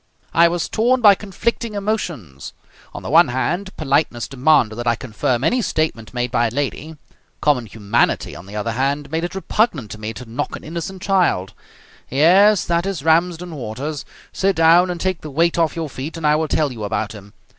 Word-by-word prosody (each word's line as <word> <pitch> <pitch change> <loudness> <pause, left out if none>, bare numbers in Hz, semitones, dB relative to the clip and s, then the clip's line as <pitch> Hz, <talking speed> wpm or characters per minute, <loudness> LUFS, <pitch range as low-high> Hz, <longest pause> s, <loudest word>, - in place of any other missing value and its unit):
I 170 +1 +6
was 170 0 -1
torn 245 +4 +2
by 210 -4 +7
conflicting 210 +3 -3
emotions. 170 - -4 0.4
On - - -9
the - - -5
one - - +6
hand, 170 +10 -2
politeness 140 -5 0
demanded 135 -4 +3
that 120 0 -4
I 120 - +3
confirm 125 +1 -2
any 245 - +2
statement 155 - -2
made 125 -1 -2
by 120 -2 +2
a - - -5
lady. 145 +4 -4 0.4
Common 135 -6 +1
humanity, 105 +2 0
on 85 +2 -11
the 100 - -9
other 105 +2 -2
hand, 140 +4 -1
made 160 +1 -1
it 175 - -6
repugnant 190 - 0
to 105 - -8
me 110 +1 -4
to 125 - -9
knock 115 +2 -4
an - - -10
innocent 175 +4 -6
child. 180 - +1 0.6
Yes, 185 - +5
that 170 +2 0
is 185 -8 -3
Ramsden 170 +2 +1
Waters. 140 +3 -5 0.3
Sit 195 0 +1
down 165 +3 +5
and 175 -1 -3
take 185 -1 -1
the 155 - -7
weight 165 +4 +1
off 165 -2 +1
your 165 -2 -3
feet, 145 +4 -7
and 165 - -4
I 150 0 +4
will 160 +1 0
tell 150 -2 0
you 115 -4 -7
about 110 0 -2
him. 100 -2 -12
155 Hz, 200 wpm, -20 LUFS, 120-175 Hz, 0.6 s, by